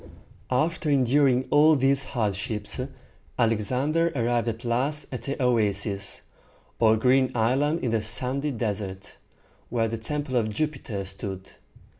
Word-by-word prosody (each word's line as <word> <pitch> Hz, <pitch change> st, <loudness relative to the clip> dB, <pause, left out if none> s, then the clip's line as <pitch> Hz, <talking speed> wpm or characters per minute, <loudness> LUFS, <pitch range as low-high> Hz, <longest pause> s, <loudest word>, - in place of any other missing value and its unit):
After 155 Hz, +5 st, 0 dB
enduring 130 Hz, -1 st, +3 dB
all 155 Hz, +2 st, +6 dB
these 135 Hz, 0 st, +3 dB
hardships, 105 Hz, -2 st, -2 dB, 0.6 s
Alexander 130 Hz, +9 st, +1 dB
arrived 120 Hz, -1 st, +1 dB
at 115 Hz, +1 st, -4 dB
last 135 Hz, +5 st, 0 dB
at 125 Hz, -4 st, -5 dB
the 140 Hz, +4 st, -4 dB
oasis, 105 Hz, -5 st, 0 dB, 0.6 s
or 110 Hz, -1 st, +5 dB
green 130 Hz, +3 st, +3 dB
island 135 Hz, +8 st, +1 dB
in 120 Hz, -, -1 dB
the 115 Hz, -1 st, +1 dB
sandy 130 Hz, +6 st, 0 dB
desert, 100 Hz, -6 st, -4 dB, 0.5 s
where 115 Hz, -1 st, +1 dB
the 115 Hz, 0 st, -4 dB
Temple 140 Hz, +2 st, -3 dB
of 110 Hz, -2 st, 0 dB
Jupiter 125 Hz, -6 st, -3 dB
stood. 95 Hz, 0 st, -7 dB
120 Hz, 125 wpm, -26 LUFS, 110-140 Hz, 0.6 s, all